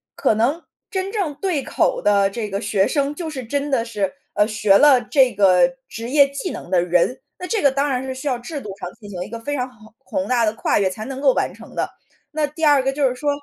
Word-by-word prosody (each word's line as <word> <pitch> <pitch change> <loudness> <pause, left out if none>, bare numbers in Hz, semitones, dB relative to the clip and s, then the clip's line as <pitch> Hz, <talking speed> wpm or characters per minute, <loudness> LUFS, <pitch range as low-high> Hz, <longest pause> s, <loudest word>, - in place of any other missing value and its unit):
可 - - +2
能 265 +10 0 0.3
真 385 -2 -3
正 385 -9 -2
对 345 -2 -1
口 - - 0
的 200 -1 +3
这 215 +1 -4
个 195 0 -3
学 205 -2 +1
生 285 -1 0
就 325 +1 -5
是 270 -4 -6
真 285 +5 -2
的 265 -5 +1
是， 210 -5 -2 0.2
呃， 210 - +3
学 215 -3 +4
了 280 -2 +6
这 250 +2 +3
个 200 +6 +4 0.2
职 230 +1 -6
业 280 +1 +6
技 280 +6 -4
能 175 - -8
的 180 -2 +4
人， 180 +7 +1 0.2
那 360 - -5
这 445 -1 0
个 280 - +5
当 280 +2 0
然 255 -2 0
是 260 0 -5
需 265 +3 -3
要 250 -2 -1
制 285 +4 -6
度 210 - -7
上 180 - -5
进 205 -3 -11
行 180 -3 -6
一 195 - -10
个 230 - -6
非 290 +5 -3
常 250 0 -2
宏 220 -3 -19
宏 285 -1 -2
大 240 -2 +3
的 215 - 0
跨 225 - +1
越 195 -2 +2
才 215 +3 -7
能 270 +1 -6
够 275 -2 +4
完 - - -1
成 - - -14
的。 - - -1 0.4
那 305 -1 0
第 305 +3 -9
二 290 -2 +5
个 270 +1 0
就 280 -1 +2
是 - - -3
说， 290 +3 -2
260 Hz, 280 characters per minute, -21 LUFS, 215-290 Hz, 0.4 s, 了